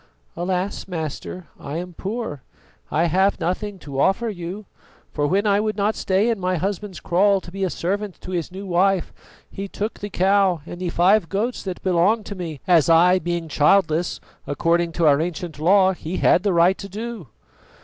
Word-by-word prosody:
"Alas, 180 +3 -2
master, 170 +1 -5
I 145 +3 -5
am 180 +1 -6
poor. 195 - -5 0.5
I 165 +3 +1
have 190 +4 +2
nothing 200 +3 -2
to 140 -2 -4
offer 225 +9 +2
you, 190 +1 -6 0.5
for 145 -1 0
when 195 +6 +1
I 200 -1 +3
would 215 0 -1
not 205 +1 +1
stay 200 +4 +1
in 225 - -2
my 185 0 0
husband's 195 +2 -3
kraal 195 +3 +3
to 175 - -12
be 195 +1 -4
a 185 - +1
servant 200 +3 -3
to 185 - -8
his 175 -2 -3
new 195 +2 -7
wife, 185 0 +1 0.4
he 195 +1 -5
took 210 +3 -4
the 205 - -5
cow 190 -2 +2
and 175 +1 -8
the 180 - -1
five 180 +1 +3
goats 225 +5 -1
that 185 -2 -6
belonged 190 +4 +2
to - - -6
me, 165 -7 -6
as, 170 -3 +4
I 180 +3 +5
being 170 -1 -3
childless, 160 +2 +2 0.3
according 170 +3 +1
to 170 - +1
our 145 0 +5
ancient 165 -2 -4
law 190 +3 +4
he 175 0 -5
had 180 - +4
the 200 0 +1
right 175 +3 +4
to 200 - -7
do." 220 - -6
185 Hz, 190 wpm, -22 LUFS, 170-200 Hz, 0.5 s, I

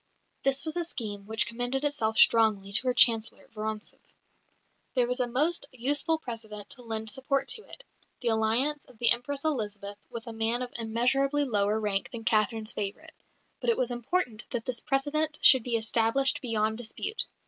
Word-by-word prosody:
This 275 +2 +1
was 315 - -3
a 345 - +1
scheme 205 -10 -3
which 220 +1 +1
commended 245 +4 -2
itself 225 -7 0
strongly 215 -4 +4
to 255 +6 +3
her 250 - +3
Chancellor, 225 -2 +3
Vorontsov. 215 0 -4 1.0
There 250 -2 +3
was 250 +1 -1
a 250 - +1
most 285 +5 +1
useful 285 +6 +1
precedent 220 -7 -7
to 250 - -9
lend 220 -2 -5
support 270 +3 -1
to 440 - -1
it - - -11 0.4
the 240 - -1
alliance 230 +7 +1
of 250 - -19
the 235 - +3
Empress 275 +5 -1
Elizabeth 205 -8 -3
with 230 -1 -7
a 230 - -7
man 225 +2 -1
of 250 - -7
immeasurably 260 +6 +1
lower 210 -3 +1
rank 205 -2 -1
than 235 -2 -7
Catherine's 220 0 +1
favourite; 210 +11 -5 0.5
but - - -1
it 465 - +3
was 250 -1 0
important 240 -2 -2
that 235 -3 -3
this 245 -2 -1
precedent 305 +3 0
should 260 -3 +8
be 235 +1 0
established 230 +4 +2
beyond 220 -2 0
dispute. 245 - -3
235 Hz, 175 wpm, -28 LUFS, 220-275 Hz, 1.0 s, should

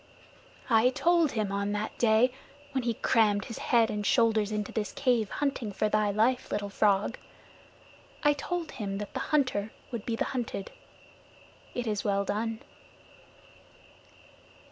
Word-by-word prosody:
"I 230 0 +5
told 335 +3 +2
him 215 -3 -1
on 200 +1 -1
that 210 +1 -3
day, 230 +2 +4 0.4
when 260 -3 -2
he 235 -2 0
crammed 205 -3 +2
his 230 - -7
head 230 -2 +3
and 210 0 -2
shoulders 220 -2 +3
into 210 -1 -2
this 215 -2 -3
cave, 245 -6 +1
hunting 275 -7 -2
for 210 +2 0
thy 215 -1 +2
life, 230 +5 +1
Little 205 -1 -2
Frog 205 +3 +2 1.0
I 295 -1 +5
told 335 +3 -4
him 195 -3 -4
that 205 0 -6
the - - -3
hunter 255 -8 +1 0.2
would 235 -4 -4
be 230 - -2
the - - -1
hunted. 235 -6 -4 1.0
It 245 - -2
is 210 -2 -1
well 200 -1 +1
done." 220 +3 -2
220 Hz, 145 wpm, -29 LUFS, 205-250 Hz, 1.0 s, I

